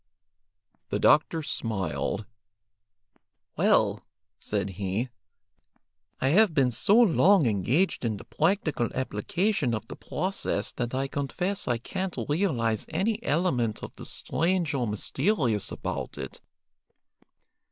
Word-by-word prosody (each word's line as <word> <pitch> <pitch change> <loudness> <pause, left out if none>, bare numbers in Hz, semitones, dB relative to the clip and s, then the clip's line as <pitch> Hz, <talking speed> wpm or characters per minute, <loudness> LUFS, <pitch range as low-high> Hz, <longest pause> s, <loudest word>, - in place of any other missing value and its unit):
The - - 0
doctor 155 +2 +3
smiled. 95 - -2 1.3
"Well," - - +3 0.4
said 100 - -2
he, 100 +6 -2 1.1
"I 130 - +2
have 190 +1 +4
been 130 -4 +3
so 195 - +2
long 195 - +5
engaged 120 - +1
in 110 -3 -1
the - - -10
practical 160 - 0
application 130 - 0
of 110 +1 -6
the - - -8
process 185 - -2
that 120 0 -3
I 135 +1 0
confess 180 +8 -2
I 120 - +1
can't 185 +9 -4
realize 130 - 0
any 205 +7 0
element 145 - 0
of - - -8
the - - -9
strange 175 -1 0
or 125 -4 0
mysterious 115 - 0
about - - -4
it. - - -7
140 Hz, 115 wpm, -27 LUFS, 115-185 Hz, 1.3 s, long